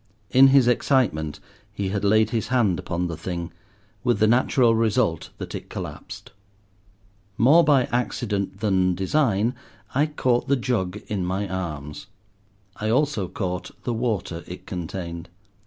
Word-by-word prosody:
In 135 +1 +8
his 135 -2 +5
excitement 110 - +1 0.3
he 100 -2 -3
had 100 0 -2
laid 110 +1 +3
his 110 -4 -1
hand 115 -8 +2
upon 90 -1 -2
the 85 -1 -3
thing, 85 +1 -5 0.5
with 120 -3 +2
the 110 - +3
natural 120 +1 +3
result 110 -6 +1
that - - -7
it - - -7
collapsed. - - -8 1.1
More 150 +9 +6
by 145 -4 +4
accident 105 -5 -2
than 95 -4 +2
design 110 +2 +1 0.4
I 145 +4 +2
caught 130 -5 0
the 140 - +3
jug 105 -7 -1
in 100 -3 -2
my 95 +3 -2
arms. 80 -4 -5 0.7
I 110 - -2
also 125 -5 +1
caught 90 -1 -4
the 120 - -1
water 110 -8 -2
it 90 - -9
contained. 85 -1 -6
105 Hz, 140 wpm, -24 LUFS, 90-125 Hz, 1.1 s, In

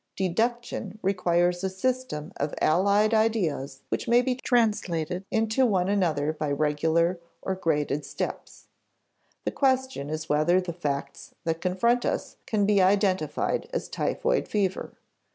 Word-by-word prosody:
Deduction 220 +2 -1
requires 175 -1 +1
a 190 - +1
system 190 -6 -2
of 145 +1 -2
allied 200 +6 +3
ideas 180 -12 0
which - - -2
may 240 +1 +5
be 255 0 +1
translated 195 -9 0
into 225 +3 +1
one 190 -6 +2
another 160 -7 +1
by 155 -1 -3
regular 160 +4 +1 0.2
or 190 - -1
graded 150 -5 0
steps. 140 - -6 0.8
The - - 0
question 260 - 0
is 155 +1 -4
whether 155 +5 +3
the 180 -2 -4
facts 145 -5 -4
that 165 0 -2
confront 235 +7 +2
us - - -2
can 210 -2 +1
be 200 -1 +4
identified 190 -4 +1
as - - -2
typhoid - - 0
fever. 195 -3 -1
185 Hz, 135 wpm, -26 LUFS, 160-215 Hz, 0.8 s, may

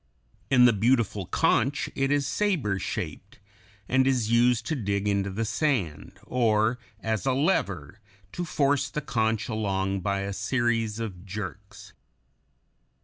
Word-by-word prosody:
In 125 -2 +6
the 125 - +6
beautiful 105 -3 +1
conch 140 +1 +1
it 135 0 0
is 145 -1 +2
saber 150 - 0
shaped, - - -5 0.5
and 130 +1 +3
is 120 -5 +1
used 120 0 +3
to 160 - -1
dig 100 -4 -1
into 100 -1 +1
the 110 +4 -2
sand, 110 - -1
or, 115 -1 +1 0.2
as 110 +3 -2
a 130 - +3
lever, 100 - 0 0.3
to 175 - -4
force 145 -3 +1
the 150 - -3
conch 110 -4 0
along 100 -4 -1
by 100 +1 -1
a 100 0 -3
series 115 +1 0
of 100 -6 -5
jerks. 100 0 -8
115 Hz, 140 wpm, -27 LUFS, 100-130 Hz, 0.5 s, In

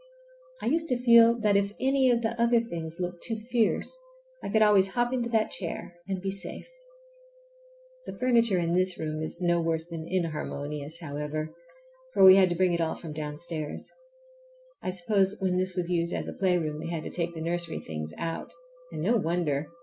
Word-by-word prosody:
I - - -2
used 325 0 +1
to 250 - +2
feel 235 -1 +6
that 210 -2 +3
if 200 0 +1
any 265 0 +3
of 235 -1 +2
the 225 - +2
other 235 0 +4
things 170 -7 -6
looked 175 -1 -4
too 225 -1 -4
fierce 240 - +1 0.5
I - - -3
could 220 +1 +4
always 205 -2 +5
hop 240 +5 0
into 240 -2 -1
that 220 -2 +1
chair 175 -1 -6
and 190 -1 -2
be 195 +1 -3
safe. 195 -1 -3 1.4
The - - -7
furniture 235 -5 +3
in 170 -1 0
this 185 0 +1
room 155 0 -3
is 160 +3 -5
no 175 -1 +2
worse 165 -1 -1
than 165 -1 -7
inharmonious, 155 -3 -3
however, 150 +1 -4 0.6
for - - +5
we 190 0 +11
had 190 -1 +5
to 175 - -1
bring 180 0 +2
it 170 - 0
all 160 - 0
from 160 -3 -8
downstairs. 155 +1 -5 0.9
I - - -3
suppose 190 +2 +2
when 185 -2 0
this 185 0 -1
was 180 -1 -2
used 170 -1 0
as - - -3
a - - -5
playroom 175 -5 0
they 165 +1 -5
had 165 -2 -3
to - - -6
take 170 -1 -3
the - - -5
nursery 170 0 -2
things 75 -1 -6
out, 165 0 -4 0.4
and - - -4
no 230 +6 +3
wonder! 160 -6 -1
180 Hz, 195 wpm, -28 LUFS, 165-210 Hz, 1.4 s, we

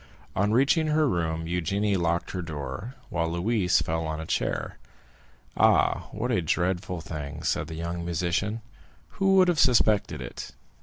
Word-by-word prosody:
On 100 +2 +2
reaching 140 +7 +3
her 155 0 +3
room 80 -5 -1
Eugénie 95 +5 0
locked 85 -1 0
her 90 - -3
door, 85 - -6
while 85 -1 -1
Louise 90 +1 +1
fell 80 0 -2
on 80 0 -3
a 80 - -5
chair. - - -2 0.8
"Ah, - - +3
what 120 +4 -2
a 95 - +2
dreadful 90 +1 -1
thing," 75 -1 -6
said - - 0
the 80 - -7
young 85 +1 -4
musician; 90 +6 -1 0.5
"who 195 0 +2
would 185 -1 +6
have 175 -4 +2
suspected 105 - +3
it? 60 - -7
90 Hz, 155 wpm, -27 LUFS, 80-110 Hz, 0.8 s, would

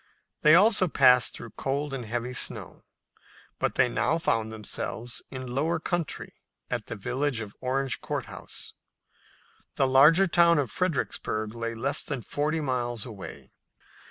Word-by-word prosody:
They 155 +1 +7
also 195 0 +5
passed 125 -5 +5
through 115 - -9
cold 140 +1 -3
and 130 -3 -4
heavy 120 +3 -3
snow, - - -1 0.8
but - - 0
they - - +4
now 120 +6 +1
found 115 -9 0
themselves 110 +2 -3
in 130 -1 -6
lower 160 +5 0
country 175 -1 -3 0.4
at - - -3
the - - -5
village 125 +5 -1
of 105 -2 -7
Orange 130 0 -1
Court - - -3
House. - - -6 1.0
The 135 - +3
larger 150 +8 +6
town 170 -2 +4
of 135 -7 0
Fredericksburg 110 -10 -2
lay 115 0 -4
less 140 +6 -1
than 135 -6 -5
forty 155 +2 -1
miles 120 -5 -2
away. 105 -6 -9
130 Hz, 145 wpm, -27 LUFS, 120-150 Hz, 1.0 s, They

